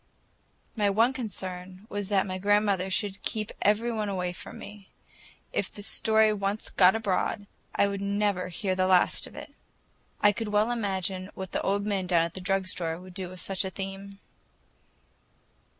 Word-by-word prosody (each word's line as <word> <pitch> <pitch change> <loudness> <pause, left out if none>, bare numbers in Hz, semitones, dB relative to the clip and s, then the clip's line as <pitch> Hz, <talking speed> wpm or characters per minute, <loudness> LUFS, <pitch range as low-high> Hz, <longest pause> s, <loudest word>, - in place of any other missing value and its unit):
My 210 -3 +2
one 225 +6 +3
concern 185 -5 -5
was 205 -2 -4
that 195 -2 +3 0.2
grandmother 200 -2 +2
should 195 +1 0
keep 215 -1 -2
every 215 +4 +3
one 215 -2 -1
away 180 -2 -2
from - - -8
me. 205 -1 -11 0.6
If 195 - -1
the 205 - -6
story 220 0 +4
once 200 +1 -2
got 185 +1 +6
abroad, 205 -1 0 0.3
I 200 - +4
would 200 0 -3
never 200 -2 0
hear 185 +2 -2
the 185 0 +1
last 185 -1 +3
of - - -14
it. - - -9 0.7
I 205 - +6
could 220 +2 -4
well 210 +3 +2
imagine 190 -4 -2
what 190 -2 -6
the - - -1
old 200 +1 0
men 195 -3 -1
down 170 -2 +4
at 170 - -6
the 190 - -6
drug 195 0 +1
store 165 -3 -1
would 185 0 -12
do 185 -1 -5
with 185 0 -7
such 195 0 0
a 190 - -2
theme. 195 +1 -6
195 Hz, 175 wpm, -28 LUFS, 185-210 Hz, 0.7 s, got